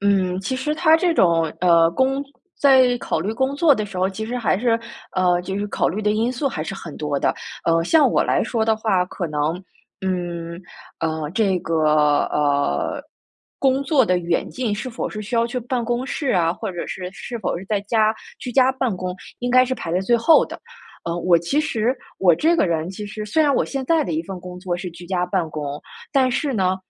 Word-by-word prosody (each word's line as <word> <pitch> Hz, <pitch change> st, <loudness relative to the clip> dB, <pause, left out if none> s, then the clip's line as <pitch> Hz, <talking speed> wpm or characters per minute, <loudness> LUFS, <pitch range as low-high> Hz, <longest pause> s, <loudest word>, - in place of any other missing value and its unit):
嗯， 190 Hz, -2 st, +1 dB
其 260 Hz, +7 st, -3 dB
实 300 Hz, +4 st, -1 dB
它 320 Hz, 0 st, +5 dB
这 345 Hz, 0 st, +1 dB
种， 170 Hz, -, +4 dB, 0.2 s
呃， 170 Hz, -2 st, +5 dB
工 265 Hz, +8 st, +1 dB, 0.4 s
在 260 Hz, -3 st, +5 dB
考 -, -, -2 dB
虑 200 Hz, +6 st, -2 dB
工 265 Hz, +4 st, -1 dB
作 310 Hz, -2 st, +5 dB
的 215 Hz, -4 st, -3 dB
时 200 Hz, -, -9 dB
候， 185 Hz, +1 st, +2 dB
其 220 Hz, +3 st, -5 dB
实 245 Hz, +2 st, -3 dB
还 235 Hz, -5 st, +1 dB
是， 230 Hz, 0 st, +2 dB, 0.3 s
呃， 180 Hz, -1 st, +2 dB
就 190 Hz, +2 st, -4 dB
是 205 Hz, -, -2 dB
考 -, -, 0 dB
虑 210 Hz, +5 st, -3 dB
的 210 Hz, -, +2 dB
因 225 Hz, +3 st, +1 dB
素 270 Hz, +3 st, -2 dB
还 155 Hz, -11 st, -4 dB
是 195 Hz, -, -5 dB
很 165 Hz, -6 st, -9 dB
多 150 Hz, -2 st, -2 dB
的。 -, -, +1 dB, 0.3 s
呃， 165 Hz, 0 st, +3 dB
像 290 Hz, -, +4 dB
我 -, -, +3 dB
来 -, -, +1 dB
说 225 Hz, 0 st, -1 dB
的 220 Hz, 0 st, +2 dB
话， 205 Hz, -5 st, +1 dB
可 180 Hz, -1 st, -4 dB
能， 150 Hz, +1 st, -1 dB, 0.5 s
嗯， 175 Hz, -2 st, -3 dB, 0.4 s
呃， 160 Hz, -2 st, -2 dB
这 190 Hz, 0 st, +1 dB
个， 155 Hz, -3 st, +2 dB
呃， 145 Hz, -, 0 dB, 0.6 s
工 270 Hz, 0 st, +2 dB
作 275 Hz, -3 st, +3 dB
的 180 Hz, -4 st, +2 dB
远 170 Hz, -1 st, -1 dB
近， 245 Hz, -5 st, -2 dB
是 245 Hz, +5 st, -5 dB
否 230 Hz, -, -4 dB
是 215 Hz, -, -6 dB
需 235 Hz, +4 st, -5 dB
要 230 Hz, 0 st, +3 dB
去 240 Hz, +2 st, -3 dB
办 245 Hz, +1 st, -2 dB
公 240 Hz, +2 st, -1 dB
室 285 Hz, -1 st, -3 dB
啊， 165 Hz, -2 st, +2 dB
或 215 Hz, +3 st, -5 dB
者 175 Hz, -2 st, -5 dB
是， 180 Hz, -1 st, -5 dB
是 240 Hz, +4 st, -7 dB
否 215 Hz, -, -2 dB
是 185 Hz, -, -9 dB
在 205 Hz, 0 st, 0 dB
家 215 Hz, +1 st, +2 dB, 0.2 s
居 245 Hz, -, -6 dB
家 260 Hz, +1 st, +5 dB
办 260 Hz, -5 st, -1 dB
公， 180 Hz, 0 st, -4 dB, 0.2 s
应 245 Hz, 0 st, -2 dB
该 255 Hz, +1 st, +6 dB
是 260 Hz, +1 st, -2 dB
排 170 Hz, -, -6 dB
在 180 Hz, -, +2 dB
最 215 Hz, +5 st, +2 dB
后 235 Hz, +8 st, +5 dB
的。 -, -, -9 dB, 0.4 s
呃， 170 Hz, 0 st, -2 dB
我 175 Hz, -1 st, +4 dB
其 170 Hz, -, -1 dB
实 250 Hz, -4 st, 0 dB, 0.2 s
我 175 Hz, -3 st, +5 dB
这 325 Hz, -, +2 dB
个 -, -, +3 dB
人 165 Hz, 0 st, -1 dB
其 205 Hz, +2 st, -7 dB
实， 215 Hz, +1 st, -6 dB
虽 265 Hz, +10 st, +2 dB
然 285 Hz, -2 st, +3 dB
我 -, -, +2 dB
现 275 Hz, -1 st, -4 dB
在 325 Hz, +1 st, +3 dB
的 170 Hz, -, -3 dB
一 160 Hz, -, -1 dB
份 190 Hz, +1 st, -6 dB
工 180 Hz, 0 st, -9 dB
作 180 Hz, -2 st, -2 dB
是 180 Hz, 0 st, -6 dB
居 175 Hz, +1 st, -12 dB
家 180 Hz, -1 st, 0 dB
办 180 Hz, -2 st, -1 dB
公， 145 Hz, -2 st, -5 dB, 0.3 s
但 265 Hz, -2 st, +3 dB
是 275 Hz, +3 st, -1 dB
呢， 190 Hz, -4 st, +1 dB
200 Hz, 245 characters per minute, -21 LUFS, 175-250 Hz, 0.6 s, 该